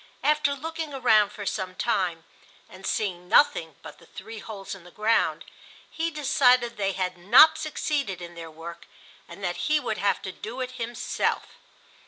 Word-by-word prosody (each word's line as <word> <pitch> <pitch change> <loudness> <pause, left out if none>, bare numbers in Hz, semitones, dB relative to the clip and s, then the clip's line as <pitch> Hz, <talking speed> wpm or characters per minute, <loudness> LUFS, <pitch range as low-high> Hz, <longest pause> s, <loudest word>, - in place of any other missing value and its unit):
After 295 -1 +2
looking 320 0 -5
around 220 -6 +4
for 205 -1 -8
some 190 -2 -3
time, 185 -8 -1 0.4
and 185 +1 -9
seeing 180 -4 -2
nothing 165 - +4
but - - -11
the - - -19
three 220 +3 -9
holes 200 -2 -7
in 195 -3 -11
the 180 - -14
ground, 215 +5 +1 0.5
he 330 +1 -1
decided 265 -5 +3
that 235 - -23
they 195 -1 0
had 185 -1 -3
not 285 - +7
succeeded 295 - -2
in 175 -1 -9
their 165 -1 -8
work 165 +2 -10 0.4
and 170 +3 -11
that 175 -1 -2
he 305 0 +4
would 235 -6 -3
have 200 - +1
to 190 - -4
do 225 +7 -8
it 255 -1 -3
himself. 240 -1 -2
215 Hz, 175 wpm, -26 LUFS, 185-265 Hz, 0.5 s, not